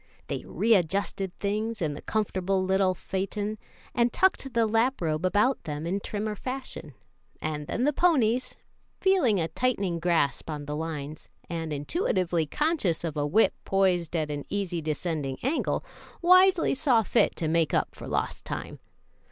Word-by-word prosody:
They - - -3
readjusted 195 -2 +1
things 215 +2 -2
in 155 -5 -1
the - - -8
comfortable 195 -3 0
little 190 0 +2
phaeton 205 +4 -3 0.3
and 240 0 +2
tucked 375 -8 +2
the 230 -1 +4
lap 230 +5 +2
robe 155 -1 -1
about 210 +8 +2
them 150 0 -4
in 185 +4 -1
trimmer 210 +1 -3
fashion, 255 - -6 0.4
and 150 -1 -4
then 240 - -1
the 295 +2 +3
ponies, 255 -7 +2 0.4
feeling 355 - +3
a 165 - 0
tightening 195 -7 -1
grasp 165 -5 +1
on 150 -2 -4
the 150 +1 -4
lines, 155 -1 -5 0.2
and 165 -2 -3
intuitively 170 - 0
conscious 295 - 0
of 160 -3 -3
a 145 -1 0
whip 215 +10 +4
poised 180 -4 +1
at 155 -2 -1
an 145 -1 -4
easily 190 -4 -2
descending 155 -3 -2
angle, 275 +6 0 0.3
wisely 365 0 +5
saw 255 -5 +3
fit - - +2
to 160 - -2
make 165 0 +2
up - - 0
for - - -9
lost - - -2
time. - - -6
190 Hz, 155 wpm, -27 LUFS, 160-230 Hz, 0.4 s, wisely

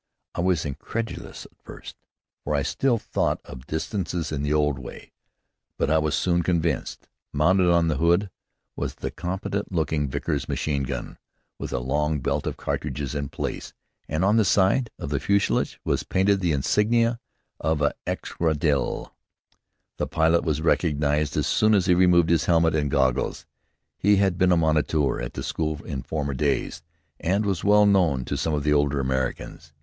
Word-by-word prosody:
I - - -2
was 90 -3 +1
incredulous 110 +11 -5
at - - -18
first, - - -11 0.5
for 75 - -1
I 70 - +1
still 130 - +1
thought - - -1
of 65 +2 -11
distances 85 0 -3
in 75 -2 -2
the 75 0 -1
old 75 -3 +1
way. 60 - -10 0.7
But 75 - 0
I 80 - +4
was 75 -3 0
soon 85 -1 +1
convinced. 85 -2 -1 0.2
Mounted 90 +5 +3
on 85 -1 +3
the 75 -4 0
hood 85 +6 +2 0.4
was - - -4
the - - -5
competent 95 +3 -4
looking 80 -4 0
Vickers 65 - -3
machine 70 -2 -1
gun, 65 - -5 0.4
with - - -5
a - - -1
long 75 +5 0
belt - - -1
of - - -3
cartridges 70 -2 -3
in 70 -1 -3
place, - - -5 0.4
and 80 +5 0
on 105 +3 +4
the 110 - +5
side 100 +5 +2
of 70 - -6
the 70 - 0
fuselage 100 0 0
were - - +1
painted 95 +1 +2
the 90 -3 0
insignia 115 - +2 0.4
of 80 -1 0
an 75 - +3 0.2
escadrille. 75 -4 -1 0.8
The - - -1
pilot 80 +1 +2
was 75 -1 -1
recognized 75 -3 +1
as - - +1
soon 110 0 +3
as 95 -3 +2
he 90 - +4
removed 90 -2 +4
his 85 -2 +2
helmet 85 -1 +3
and 75 -2 0
goggles. 65 -2 0 0.5
He 100 +2 +4
had 95 -3 +1
been 90 0 +4
a 90 - +4
moniteur 75 -4 +1
at - - -5
the - - -5
school 80 -2 -2
in 70 -6 -4
former 70 +1 -3
days, 65 - -1 0.4
and 100 +5 0
was 95 -5 -1
well 105 +1 +5
known 85 -11 +3
to - - -3
some 80 -2 -1
of 75 - -2
the 75 0 +2
older 70 -1 +2
Americans. 65 +4 -3
80 Hz, 175 wpm, -25 LUFS, 75-95 Hz, 0.8 s, the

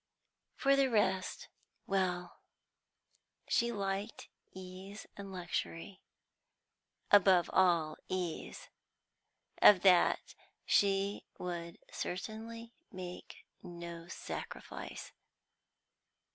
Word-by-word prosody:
For 275 0 +4
the 275 -1 +3
rest 200 -5 +1 0.4
well, 180 -2 -1 1.1
she 235 0 +2
liked 200 0 -3 0.2
ease 190 +2 -9
and 200 -1 -8
luxury; 180 +1 -4 1.1
above 190 -3 +6
all, 170 -4 +3
ease. 180 -3 -4 0.9
Of 200 -4 +9
that 180 -3 +4 0.3
she 200 0 +2
would 170 -1 -5
certainly 230 +5 -5 0.2
make 180 -2 -8 0.2
no 170 -1 -8
sacrifice. 185 - -7
190 Hz, 75 wpm, -34 LUFS, 175-205 Hz, 1.1 s, Of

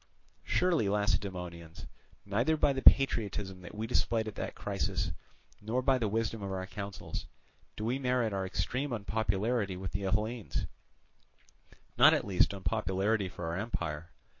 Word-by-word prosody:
"Surely, 170 - +2
Lacedaemonians, 90 -5 -2 0.4
neither 120 +10 +1
by 145 -2 +3
the 135 - -2
patriotism 105 -9 +4
that 90 - -10
we 110 +1 -3
displayed 115 -1 +1
at 110 - -4
that - - -5
crisis, - - -2 0.5
nor 115 +5 -1
by 130 -1 +3
the 115 - +1
wisdom 110 +1 -1
of 100 -1 -4
our 95 -1 -3
counsels, 100 0 -6 0.5
do 105 - -3
we 125 +4 0
merit 125 -4 +1
our 95 -1 -1
extreme 125 +10 -2
unpopularity 105 -1 0
with 95 -1 -5
the 100 - -2
Hellenes, 105 +4 -1 1.3
not - - +9
at - - -1
least 95 -3 +3
unpopularity 100 0 0
for 85 - -7
our 85 +1 -2
empire. 85 -6 -3
105 Hz, 145 wpm, -31 LUFS, 95-115 Hz, 1.3 s, not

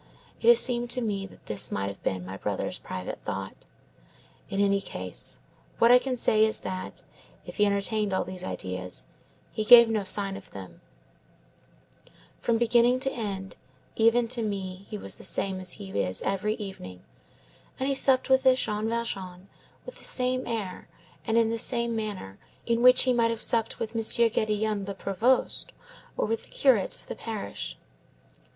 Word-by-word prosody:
It - - -1
has 475 -1 +9
seemed 240 -1 +2
to 250 +1 0
me 200 -4 -2
that - - -19
this 105 -2 0
might 100 0 -2
have 100 - -10
been 95 -1 -3
my 95 +1 -7
brother's 100 0 -3
private 90 0 -6
thought. - - -6 0.8
In 195 - -3
any 200 0 +2
case, 90 - -1 0.4
what 230 +1 +5
I 250 - +8
can 255 0 -3
say 215 -2 +3
is 220 0 0
that, 185 0 -6 0.4
if - - -10
he 210 -1 +4
entertained 205 +1 0
all 190 - 0
these 185 -1 -7
ideas, 90 - -4 0.5
he 215 - -3
gave 235 +1 +9
no 215 -2 0
sign 195 0 0
of - - -11
them; 95 -4 -11 1.6
from 230 -1 +1
beginning 240 +2 +3
to 270 0 0
end, 195 -4 -5 0.4
even 230 +1 +3
to 245 -1 +1
me 195 -3 -5
he 210 - -5
was - - -5
the - - -13
same 190 -1 -2
as 185 -1 -1
he 95 - -8
is 95 -2 -1
every 210 +2 -1
evening, 140 - -9 0.8
and 265 - -1
he 280 - +1
supped 265 -1 +3
with 265 0 +4
this 260 0 +4
Jean 215 0 -1
Valjean 195 -5 -5 0.4
with - - -9
the - - -12
same 255 0 +2
air 210 -6 -4 0.4
and 225 0 +1
in 225 -1 +3
the 230 - -2
same 235 0 +1
manner 200 - -5 0.3
in 235 0 0
which 250 +1 +7
he 255 - +2
would 230 -1 +2
have 230 -1 -2
supped 225 -1 +2
with 225 0 -5
M. 225 - 0
Gédéon 215 -3 +1
le 200 - -5
Prévost, 215 +7 0 0.5
or - - +1
with 225 +1 -3
the - - -18
curate 250 -9 +2
of - - -16
the - - -6
parish. 195 - -6
215 Hz, 180 wpm, -27 LUFS, 190-235 Hz, 1.6 s, has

